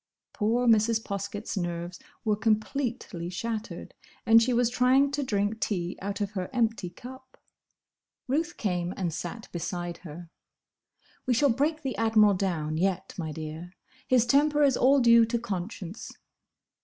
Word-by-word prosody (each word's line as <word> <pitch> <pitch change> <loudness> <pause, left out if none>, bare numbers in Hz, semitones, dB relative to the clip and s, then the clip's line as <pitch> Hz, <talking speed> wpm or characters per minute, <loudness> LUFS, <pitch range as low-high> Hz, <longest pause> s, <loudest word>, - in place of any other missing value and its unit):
Poor 230 +4 +1
Mrs. 225 0 +3
Poskett's 200 +2 -5
nerves 175 -1 -4 0.3
were 215 -1 +2
completely 215 -4 -1
shattered, 220 +4 -5 0.3
and 225 0 +7
she 245 +2 +1
was 240 0 +3
trying 260 +3 +3
to 285 +1 -1
drink 210 -3 -1
tea 180 -5 -2
out 200 +2 -4
of 205 -1 -1
her 185 -3 -4
empty 230 -6 0
cup. 260 +7 -12 0.9
Ruth 315 +6 -1
came 180 -3 -2
and 175 -4 -2
sat 225 +7 -6
beside 175 0 -4
her. 170 0 -11 1.0
"We 250 - +3
shall 280 +2 +4
break 300 +5 0
the 265 -2 -2
Admiral 220 -2 +4
down, 165 -5 -2
yet, 185 +1 -1
my 160 -2 -3
dear. 160 +3 -7 0.3
His 255 -3 +4
temper 295 +4 +3
is 275 -3 +4
all 270 +2 +4
due 235 -1 +7
to 235 +1 -1
conscience." 195 -3 -6
220 Hz, 145 wpm, -27 LUFS, 180-245 Hz, 1.0 s, and